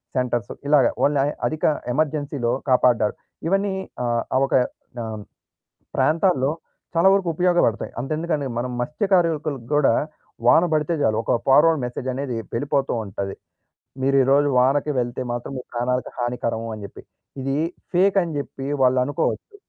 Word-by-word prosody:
Centres 120 Hz, -4 st, -1 dB, 0.2 s
ఇలాగ 145 Hz, -4 st, +5 dB, 0.2 s
only 140 Hz, -1 st, +3 dB, 0.2 s
అధిక 155 Hz, 0 st, -1 dB, 0.3 s
ఎమర్జెన్సీ‌లో 145 Hz, -4 st, -1 dB, 0.2 s
కాపాడారు. 125 Hz, -4 st, +3 dB, 0.3 s
ఇవన్నీ 195 Hz, +1 st, +1 dB, 0.3 s
ఆహ్, 120 Hz, -1 st, +1 dB
ఆ -, -, +5 dB
ఒక -, -, -5 dB, 0.5 s
ఆహ్, 110 Hz, -1 st, -5 dB, 0.8 s
ప్రాంతాల్లో 155 Hz, -4 st, +2 dB, 0.5 s
చాలా 180 Hz, +3 st, +6 dB
వరకు 190 Hz, -3 st, +1 dB
ఉపయోగపడతాయి. 175 Hz, -10 st, +1 dB
అంతెందుకండి 155 Hz, +1 st, -2 dB
మనం 125 Hz, +1 st, -2 dB
మత్స్యకారులకు 155 Hz, -, 0 dB
గూడా 145 Hz, -5 st, +4 dB, 0.5 s
వాన 160 Hz, +8 st, +6 dB
బడితే 155 Hz, +2 st, +1 dB
చాలు. 110 Hz, -1 st, +2 dB
ఒక -, -, +1 dB
ఫార్వర్డ్ 150 Hz, +3 st, +5 dB
మెసేజ్ 125 Hz, +1 st, -5 dB
అనేది 135 Hz, -2 st, -3 dB, 0.2 s
వెళ్ళిపోతూ 140 Hz, +2 st, 0 dB
ఉంటది. 95 Hz, 0 st, -5 dB, 0.7 s
"మీరు 135 Hz, +1 st, +3 dB
ఈరోజు 140 Hz, +2 st, +3 dB
వానకి 140 Hz, +4 st, +2 dB
వెళ్తే 120 Hz, +1 st, -3 dB
మాత్రం 120 Hz, +3 st, -5 dB
మీ -, -, -5 dB
ప్రాణాలకి 125 Hz, +1 st, -1 dB
హానికరము." 115 Hz, -2 st, -2 dB
అని 105 Hz, -, -9 dB
జెప్పి. 100 Hz, -, -10 dB, 0.4 s
ఇది 135 Hz, +1 st, -1 dB, 0.4 s
ఫేక్ 195 Hz, +3 st, +3 dB
అని 165 Hz, -2 st, -4 dB
జెప్పి 135 Hz, -1 st, -6 dB, 0.2 s
వాళ్ళనుకోవచ్చు. 130 Hz, -, +1 dB
135 Hz, 130 wpm, -23 LUFS, 120-155 Hz, 0.8 s, చాలా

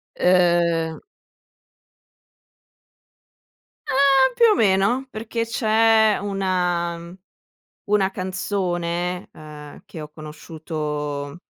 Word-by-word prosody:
Ehm 170 Hz, -2 st, +2 dB, 2.9 s
Ehm! 270 Hz, -1 st, +4 dB
Più 470 Hz, -, +4 dB
o 430 Hz, -, +5 dB
meno, 210 Hz, -, +2 dB
perché 230 Hz, 0 st, -4 dB
c'è 220 Hz, -1 st, +3 dB
una, 180 Hz, -4 st, -1 dB
mhmm, 170 Hz, +1 st, -11 dB, 0.7 s
una 200 Hz, -2 st, +2 dB
canzone, 180 Hz, -2 st, -3 dB
uhm, 150 Hz, -1 st, -12 dB
che 160 Hz, -, -9 dB
ho 150 Hz, -, -8 dB
conosciuto, 150 Hz, -1 st, -6 dB
180 Hz, 80 wpm, -22 LUFS, 165-215 Hz, 2.9 s, o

